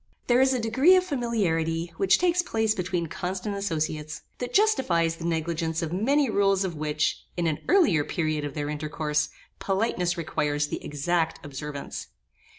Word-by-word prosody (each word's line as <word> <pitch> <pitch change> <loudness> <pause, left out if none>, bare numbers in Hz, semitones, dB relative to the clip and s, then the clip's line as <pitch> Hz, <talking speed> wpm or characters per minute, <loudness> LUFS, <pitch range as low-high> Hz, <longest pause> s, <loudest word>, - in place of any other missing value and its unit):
There 245 +1 +4
is 265 0 +4
a 255 - +1
degree 260 +11 +5
of 370 - +4
familiarity 175 - -1
which 195 -1 +4
takes 355 0 +2
place 220 -9 0
between 180 -3 -2
constant 185 +5 -4
associates, 155 -5 -3 0.2
that 245 - -4
justifies 180 - +2
the 165 - -6
negligence 165 0 -1
of 160 0 -3
many 275 +9 +2
rules 195 -3 +2
of 180 -3 -3
which, 150 0 -1
in 175 - 0
an 155 -2 0
earlier 325 - +4
period 155 -1 -1
of 145 -1 -5
their 145 -1 -2
intercourse, 150 0 -1 0.3
politeness 190 -3 0
requires 145 -2 -1
the - - -5
exact 160 +3 -1
observance. 145 0 -6
170 Hz, 155 wpm, -26 LUFS, 155-220 Hz, 0.3 s, degree